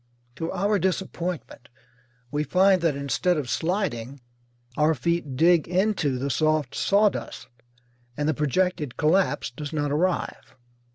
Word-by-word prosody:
To 165 0 -3
our 200 +2 +1
disappointment 180 -6 -3 0.6
we 150 +1 0
find 185 +4 +3
that 165 -4 +1
instead 140 +6 0
of 145 -4 -3
sliding 150 - -2 0.6
our 155 +2 +3
feet 160 -1 -2
dig 165 +3 +4
into 180 -7 +1
the 140 +2 -2
soft 155 -3 +1
sawdust, 205 0 0 0.7
and 145 0 -1
the 155 - +2
projected 150 0 -1
collapse 170 -1 +1
does 145 +3 -7
not 145 -2 -1
arrive. 175 +5 -2
160 Hz, 125 wpm, -25 LUFS, 145-180 Hz, 0.7 s, dig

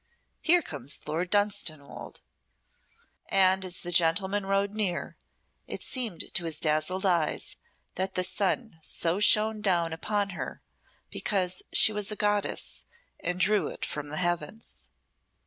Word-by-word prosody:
Here 345 +1 +4
comes 140 -1 -5
Lord 165 +4 -2
Dunstanwolde." 205 -8 -1 1.1
And 190 0 +4
as 185 -1 -5
the 175 - -4
gentleman 190 +4 +3
rode 195 +1 0
near, 205 -5 -2 0.5
it - - -4
seemed 235 -9 -2
to 170 - 0
his 160 -2 -1
dazzled 155 +5 +1
eyes 170 -5 +1 0.4
that 190 +1 -3
the 185 - +1
sun 200 0 -1
so 165 +3 -2
shone 215 +1 +5
down 170 -5 +1
upon 200 +4 -1
her 175 - -7 0.5
because 185 -3 -1
she 215 - +7
was 210 0 -1
a - - -2
goddess 205 -1 -1 0.4
and 180 0 -3
drew 210 +3 +2
it - - -4
from 150 -1 -5
the 155 - -4
heavens. 175 +4 -3
185 Hz, 135 wpm, -28 LUFS, 165-205 Hz, 1.1 s, she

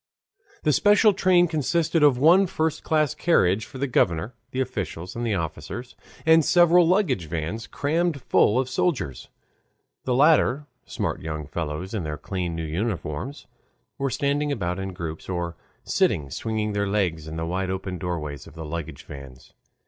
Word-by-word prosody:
The 150 - +3
special 205 - +5
train 180 -2 +4
consisted 160 +1 0
of 145 -4 +5
one 175 +8 +5
first 160 -2 -1
class 155 -3 +1
carriage 110 - +2
for - - -11
the 140 - 0
governor, 95 - +1 0.2
the 130 - -4
officials, 100 -9 -4
and 120 -1 -2
officers, 85 +9 -5 0.3
and 160 0 +6
several 175 +1 +5
luggage 180 - +1
vans 85 +8 -4
crammed 160 +1 0
full 120 -2 +3
of 130 -1 +1
soldiers. 130 - -2 0.8
The 125 - +1
latter, 145 -1 +4 0.2
smart - - -3
young 75 -1 -4
fellows 80 +5 -4
in 105 - -1
their 75 -2 -4
clean 90 -3 -4
new 80 0 -3
uniforms, 90 - -4 0.5
were 135 0 0
standing 145 +3 0
about 90 -7 -2
in 95 0 -4
groups 85 -2 -6
or 85 -2 -3 0.3
sitting 70 -3 +1
swinging 110 - -2
their 100 0 0
legs 90 -6 -1
in 80 - -6
the 80 0 -3
wide 90 +2 -2
open 95 -1 -4
doorways 80 -5 -4
of - - -14
the 80 -1 -7
luggage 85 0 -6
vans. 70 -2 -12
105 Hz, 160 wpm, -24 LUFS, -, 0.8 s, and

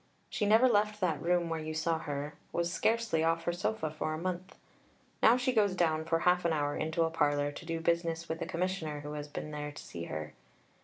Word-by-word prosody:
She 210 - 0
never 225 +5 +6
left 210 -2 +2
that 160 -6 +1
room 175 +1 +2
where 165 -1 -2
you 155 0 -4
saw 160 +1 +1
her, 145 -1 -4 0.2
was 170 +1 -1
scarcely 225 -8 +1
off 165 0 +1
her 175 - 0
sofa 175 -2 -1
for 155 0 -2
a - - -4
month. 185 +2 -4 0.6
Now 235 +2 +7
she 255 0 +1
goes 205 -5 +3
down 160 -3 +1
for 165 0 +1
half 180 0 +3
an 170 -1 +2
hour 145 -1 0
into 160 +1 0
a 165 - 0
parlour, 145 -2 +1
to 155 - -10
do 165 -1 -2
business 165 0 0
with 160 - -4
a - - -2
Commissioner 170 -4 -2
who 150 0 -6
has 150 0 -5
been 150 +1 -6
there 150 0 -4
to 145 - -10
see 85 0 -7
her. 80 -1 -5
165 Hz, 225 wpm, -32 LUFS, 155-180 Hz, 0.6 s, Now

